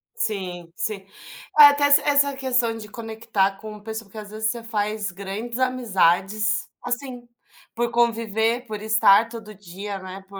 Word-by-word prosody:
Sim. 180 - -4
Sim. 200 -2 -4 0.5
É, - - +12
até, 285 0 +5
essa 285 0 +6
essa 285 -1 +2
questão 250 -4 0
de 215 -2 -8
conectar 220 -4 -2
com 215 0 -9
pesso 220 0 -6
porque, 200 +2 -15
às 210 -1 -8
vezes, 215 0 -1
você 235 -1 -7
faz 210 -2 -2
grandes 200 +6 -6
amizades, 210 -4 +1 0.2
assim, 245 -1 -5 0.5
por 235 0 -1
conviver, 230 0 +1
por 215 -2 -6
estar 220 0 +4
todo 225 -2 -9
dia, 195 +1 -7
né, 190 +1 -9
por 195 0 -10
220 Hz, 155 wpm, -23 LUFS, 200-235 Hz, 0.5 s, É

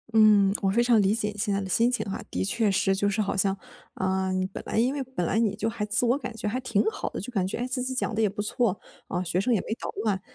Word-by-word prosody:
嗯， 205 -3 +6
我 195 - +2
非 235 +5 +3
常 235 -3 +4
理 195 +1 +3
解 210 -2 -2
现 205 -1 0
在 200 - +1
你 - - -3
的 - - -7
心 235 +2 +3
情 245 - -1
哈。 195 - -4
的 - - -2
确 220 +1 +1
是 195 0 +2
就 205 +1 +1
是 210 - -2
好 200 -2 0
像， 195 0 +1 0.4
啊， 190 0 0
你 185 0 0
本 190 - -7
来 - - -2
因 250 +4 +3
为 285 - -3
本 260 -9 -3
来 210 +6 +1
你 210 -3 +1
就 225 - -2
还 220 -2 -3
自 230 +3 +2
我 240 +3 +3
感 275 -3 -5
觉 210 - -3
还 250 +5 -1
挺 225 -4 +1
好 - - -4
的， - - -6
就 240 +6 -7
感 190 -3 +1
觉， 190 - -4
诶， 245 +1 -2
自 255 0 -1
己 260 +1 -2
讲 240 - -1
得 220 - 0
也 210 - +3
不 205 - -11
错， 210 -1 +1 0.3
啊， 180 - -2
学 180 +1 0
生 245 - 0
也 220 - +3
没 220 - -4
捣 - - -4
乱。 195 -3 0
210 Hz, 330 characters per minute, -26 LUFS, 195-235 Hz, 0.4 s, 嗯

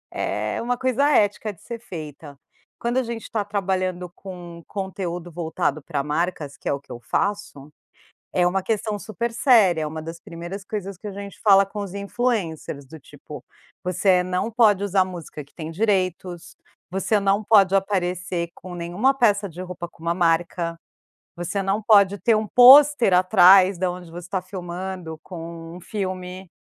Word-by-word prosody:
é - - -2
uma 245 +1 -1
coisa 260 +3 +1
ética 210 -5 +2
de 175 - -23
ser 235 -1 -7
feita. 155 - -9 0.4
Quando 240 +2 -1
a 260 - +2
gente 230 -1 -6
tá 215 -2 0
trabalhando 185 -3 -2
com 175 -3 -10
conteúdo 180 -3 -5
voltado 160 -3 -2
pra 140 -1 -3
marcas, 150 -1 -2
que - - -9
é - - +2
o 140 - -3
que 140 - -18
eu 120 - -7
faço, 150 +1 -3 0.6
é 180 - +3
uma 185 +2 +1
questão 215 0 -2
super 230 +3 -4
séria. 225 - +4
É 155 - -2
uma 160 +1 -6
das 165 +1 -8
primeiras 175 +4 -8
coisas 200 -2 -5
que 210 - -9
a - - -5
gente 200 0 -9
fala 195 -2 +6
com 200 +2 -8
os 195 -2 -6
influencers, 200 - -2
do 160 +3 -11
tipo: - - -12 0.4
"Você 180 +1 +2
não 185 +5 -2
pode 215 -4 +4
usar 195 -2 +2
música 170 -4 -8
que 140 - -26
tem 160 -2 -6
direitos. 185 -2 -1 0.4
Você 195 +3 +1
não 200 +1 +1
pode 195 -3 +5
aparecer 180 -3 -1
com 180 0 -10
nenhuma 175 +10 +1
peça 205 -6 +2
de 170 +1 -12
roupa 180 -2 -7
com 165 - -23
uma 170 0 +1
marca. 170 -1 0 0.6
Você 175 +3 -3
não 195 +2 0
pode 200 -2 +5
ter 230 - +3
um 215 0 -1
pôster 260 -2 +7
atrás 185 +1 +6
da 185 0 0
onde 175 -1 -9
você 175 +1 -9
tá 190 +1 -1
filmando 180 -2 -6
com 165 -1 -9
um - - -10
filme". 185 -2 -5
185 Hz, 175 wpm, -23 LUFS, 170-205 Hz, 0.6 s, pôster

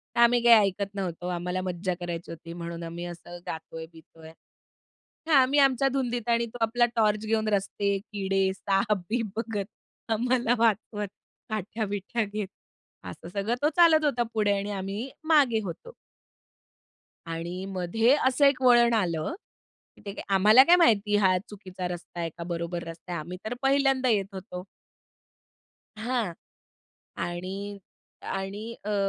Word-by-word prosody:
तर - - 0
आम्ही 240 0 +5
काही 225 -4 +7
ऐकत 200 +1 -4
नव्हतो. 180 -3 -4
आम्हाला 180 +1 -2
मज्जा 185 0 -2
करायची 175 -1 -5
होती, 165 0 -9
म्हणून 170 0 -6
आम्ही 170 +1 -6
असं 175 0 -9
गातोय-बितोय 160 0 -9 1.0
हां. 320 - +4
आम्ही 270 +3 +3
आमच्या 270 -1 +4
धुंदीत 245 -3 -1
आणि 235 0 +3
तो 235 - -10
आपला 240 +2 +3
टॉर्च 215 -1 +2
घेऊन 220 0 0
रस्ते, 200 0 0
किडे, 195 -2 -1
साप 195 +2 +1
बीप 230 +1 0
बघत 225 -3 -2 0.5
आम्हाला 245 +1 +1
वाचवत, 215 -2 +1 0.4
काठ्या 215 +1 -3
बिठ्या 205 +3 -2
घेत. 205 0 -4 0.6
असं - - -9
सगळं 200 +5 -1
तो 295 - +4
चालत 330 -3 +6
होता 250 -5 +2
पुढे 210 -2 +2
आणि 200 +1 -3
आम्ही 200 +5 -4 0.2
मागे 280 -8 +4
होतो. 190 - -7 1.3
आणि 170 +3 -5
मध्ये 195 +7 +2
असं 265 +2 +3
एक 275 -2 +3
वळण 240 -2 +6
आलं, 180 - 0 0.6
की - - -18
ते 200 0 -6
आम्हाला 210 +6 +7
काय 340 +5 +6
माहिती? 210 - +4
हा 190 -3 +4
चुकीचा 190 -3 -6
रस्ता 175 0 -7
आहे 165 -1 -1
का, 170 - -5
बरोबर 170 0 -4
रस्ता 165 +2 -9
आहे? 170 - -2
आम्ही 180 +4 -7
तर 220 - -2
पहिल्यांदा 270 -1 +3
येत 205 -4 +2
होतो. 185 -1 -7 1.3
हां. 225 -4 -2 0.8
आणि, 190 +4 -5 0.4
आणि 195 +3 -4 0.2
अ, 210 0 -1
205 Hz, 145 wpm, -27 LUFS, 180-235 Hz, 1.3 s, काही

